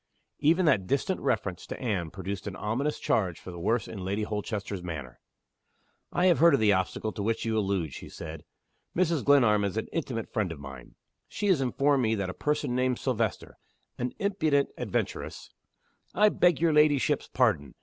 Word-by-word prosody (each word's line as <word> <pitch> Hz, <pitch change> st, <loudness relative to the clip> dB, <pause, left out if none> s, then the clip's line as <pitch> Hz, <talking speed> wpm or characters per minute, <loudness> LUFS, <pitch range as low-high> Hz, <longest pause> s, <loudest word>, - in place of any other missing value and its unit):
Even 170 Hz, +5 st, +3 dB
that 110 Hz, -, +3 dB
distant 160 Hz, -, 0 dB
reference 95 Hz, -4 st, -1 dB
to -, -, -6 dB
Anne 100 Hz, -10 st, -1 dB
produced 95 Hz, +3 st, -6 dB
an 100 Hz, -, -5 dB
ominous 130 Hz, +10 st, -1 dB
change 90 Hz, -6 st, 0 dB
for 90 Hz, -, -9 dB
the 85 Hz, -, -8 dB
worse 110 Hz, +5 st, 0 dB
in 100 Hz, -4 st, -7 dB
Lady 100 Hz, +3 st, -1 dB
Holchester's 105 Hz, -2 st, -4 dB
manner. 75 Hz, -8 st, -7 dB, 0.9 s
"I 175 Hz, -, +1 dB
have 175 Hz, -3 st, +4 dB
heard 165 Hz, -2 st, +7 dB
of -, -, 0 dB
the 105 Hz, -2 st, +4 dB
obstacle 95 Hz, +3 st, -1 dB
to 105 Hz, -, -6 dB
which 115 Hz, +3 st, -1 dB
you 110 Hz, -1 st, 0 dB
allude," 95 Hz, -8 st, 0 dB
she -, -, -9 dB
said. 80 Hz, 0 st, -8 dB, 0.5 s
"Mrs. 170 Hz, -5 st, +1 dB
Glenarm 120 Hz, -8 st, +5 dB
is 100 Hz, +1 st, -2 dB
an 110 Hz, -, -1 dB
intimate 130 Hz, -8 st, -3 dB
friend 105 Hz, -6 st, 0 dB
of 80 Hz, -, -8 dB
mine. 70 Hz, -3 st, -10 dB, 0.3 s
She 210 Hz, -, -4 dB
has 175 Hz, -8 st, +4 dB
informed 135 Hz, +2 st, +2 dB
me 110 Hz, -2 st, +2 dB
that 100 Hz, -3 st, -2 dB
a -, -, -9 dB
person 150 Hz, -1 st, -1 dB
named 125 Hz, -1 st, +1 dB
Silvester, 115 Hz, -5 st, -2 dB, 0.4 s
an 125 Hz, 0 st, -2 dB
impudent 160 Hz, -8 st, +1 dB
adventuress -, -, -4 dB, 0.3 s
" -, -, -42 dB, 0.3 s
"I 210 Hz, 0 st, +6 dB
beg 175 Hz, -6 st, +3 dB
your 165 Hz, -1 st, +3 dB
ladyship's 150 Hz, -1 st, +3 dB
pardon. 85 Hz, -, +1 dB
110 Hz, 185 wpm, -28 LUFS, 95-145 Hz, 0.9 s, heard